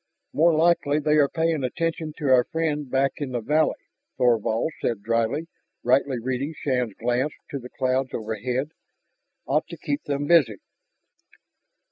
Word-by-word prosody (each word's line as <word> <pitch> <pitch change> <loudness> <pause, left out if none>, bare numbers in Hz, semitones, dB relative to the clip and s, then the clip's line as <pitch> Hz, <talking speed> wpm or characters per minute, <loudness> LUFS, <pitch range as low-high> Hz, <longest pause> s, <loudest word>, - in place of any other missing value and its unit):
"More 165 +1 +4
likely 160 -3 +3
they 150 0 +2
are 145 -2 +4
paying 160 -3 0
attention 165 +4 -2
to 145 -4 -1
our 125 -1 +6
friend 150 -4 -2
back 135 +1 +2
in 140 -4 -4
the 120 - 0
valley," 150 +7 +2 0.4
Thorvald 115 +3 +2
said 115 -4 -1
dryly, 115 +7 0 0.4
rightly 130 +1 +2
reading 130 +6 -3
Shann's 125 -6 -1
glance 125 +5 0 0.2
to 140 - -3
the 125 0 -10
clouds 130 0 -1
overhead. 120 +6 -3 0.7
"Ought 150 +3 0
to 170 - -9
keep 145 -1 -2
them 145 0 -1
busy." 145 -9 +4
135 Hz, 145 wpm, -24 LUFS, 125-155 Hz, 0.7 s, our